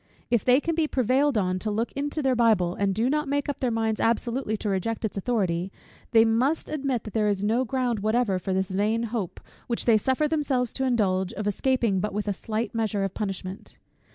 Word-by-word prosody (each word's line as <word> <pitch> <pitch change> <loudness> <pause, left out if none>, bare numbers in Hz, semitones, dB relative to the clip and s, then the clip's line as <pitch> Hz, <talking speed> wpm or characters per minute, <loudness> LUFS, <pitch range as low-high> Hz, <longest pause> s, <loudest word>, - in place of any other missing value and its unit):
If 235 -3 +3
they 255 +1 +5
can 330 +3 -1
be 320 -1 +1
prevailed 260 +1 +2
on 185 -2 0
to 215 - -3
look 220 +3 -1
into 290 +2 -3
their 265 -1 +3
Bible, 220 -7 +3
and 200 +1 0
do 225 +4 +1
not 300 +2 0
make 285 0 -1
up 285 - -3
their 255 - +1
minds 225 -1 0
absolutely 235 0 0
to 210 - -4
reject 205 +4 -1
its 215 - -4
authority; 190 -4 -1 0.4
they 225 -1 +6
must 250 +8 +1
admit 275 -5 -1
that 215 - -9
there 215 -2 +2
is 200 -1 0
no 230 +5 +2
ground 250 -2 -1
whatever 215 -2 +1
for 190 - -4
this 190 +1 0
vain 215 +4 +1
hope, 205 -7 -3 0.3
which 235 - -2
they 225 -3 +5
suffer 260 +7 +1
themselves 280 -6 0
to 265 - -1
indulge, 190 -7 +1
of 210 - -4
escaping 225 -1 +1
but 205 +1 -3
with 210 0 -2
a 205 - +1
slight 220 +5 -3
measure 220 -3 0
of 195 -1 -2
punishment. 195 -2 -5
225 Hz, 215 wpm, -26 LUFS, 200-255 Hz, 0.4 s, they